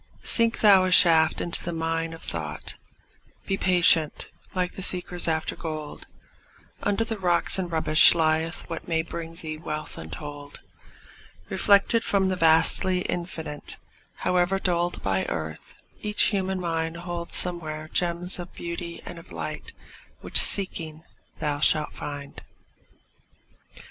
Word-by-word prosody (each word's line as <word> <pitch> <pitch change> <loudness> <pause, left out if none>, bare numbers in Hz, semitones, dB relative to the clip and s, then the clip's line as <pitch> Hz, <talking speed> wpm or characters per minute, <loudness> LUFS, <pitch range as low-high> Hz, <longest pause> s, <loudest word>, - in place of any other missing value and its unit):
Sink 230 -1 +4
thou 200 -3 +6
a 185 - 0
shaft 165 -3 +6
into 170 - -4
the 175 - -3
mine 165 0 -3
of 165 - -11
thought; 75 -3 -6 0.7
Be 195 - -1
patient, 175 -4 +2 0.2
like 180 -1 -1
the - - -8
seekers 180 -2 +2
after 160 -1 -1
gold; 155 -3 -7 0.7
Under 205 +2 0
the 225 -2 -5
rocks 175 0 +2
and 180 -2 -4
rubbish 155 0 +5
lieth 160 0 -1
what 165 -1 -7
May 165 -2 0
bring 165 0 -8
thee 155 -2 -7
wealth 155 -1 -5
untold. 145 - -9 0.9
Reflected 205 +3 +3
from 195 -1 +1
the 185 - -1
vastly 170 +2 +3
Infinite, 165 -5 -6 0.4
However 180 +1 0
dulled 175 -2 -1
by 95 -1 0
earth, 80 -1 -6 0.3
each 210 0 +1
human 190 -2 -2
mind 165 -1 -3
Holds 170 -1 -4
somewhere 155 -3 -2
gems 175 +2 0
of 175 0 -9
beauty 170 0 -7
and 175 -1 -8
of 165 - -16
light 80 -2 -6 0.5
Which, 65 - +2
seeking, 160 - +3 0.3
thou 150 -2 -3
shalt 150 0 +2
find. 145 -1 -8
170 Hz, 135 wpm, -25 LUFS, 155-180 Hz, 0.9 s, thou